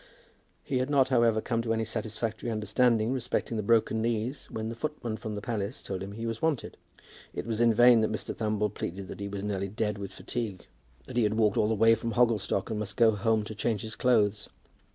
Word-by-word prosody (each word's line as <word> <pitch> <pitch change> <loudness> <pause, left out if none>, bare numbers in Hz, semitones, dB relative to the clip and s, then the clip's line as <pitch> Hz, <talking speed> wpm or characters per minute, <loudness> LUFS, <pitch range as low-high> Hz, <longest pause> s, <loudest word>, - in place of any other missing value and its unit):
He 130 - -1
had 130 +2 -1
not, 135 -3 +3
however, 115 -4 +3
come 115 0 -1
to 115 -1 0
any 110 0 0
satisfactory 110 +1 -3
understanding 110 +2 +2
respecting 125 -2 -2
the 110 - 0
broken 110 +1 +2
knees 115 +4 -2
when 110 0 -4
the 115 - -3
footman 120 -4 -3
from 110 -1 -5
the 105 - -6
palace 110 0 -3
told 95 -2 -4
him 100 +1 -6
he 115 +2 -5
was 115 -1 -3
wanted. 160 -5 -1 0.6
It - - -3
was 115 -1 -1
in 120 -1 +5
vain 120 +1 +6
that 110 - +1
Mr. 110 - -4
Thumble 105 -2 0
pleaded 95 0 -5
that - - -8
he 100 - -3
was 100 0 -5
nearly 100 -2 -2
dead 105 0 -2
with 100 -1 -6
fatigue, 105 -2 -5 0.4
that - - -7
he - - +4
had 105 0 +1
walked 110 -2 +3
all 105 - +3
the 110 - +1
way 115 +2 +6
from 115 0 -2
Hogglestock 115 -4 +1
and 110 - -2
must 105 -1 -4
go 115 -2 +6
home 110 +1 +1
to 105 - -6
change 105 0 -1
his 110 0 -6
clothes. 105 -4 +2
110 Hz, 225 wpm, -29 LUFS, 105-115 Hz, 0.6 s, vain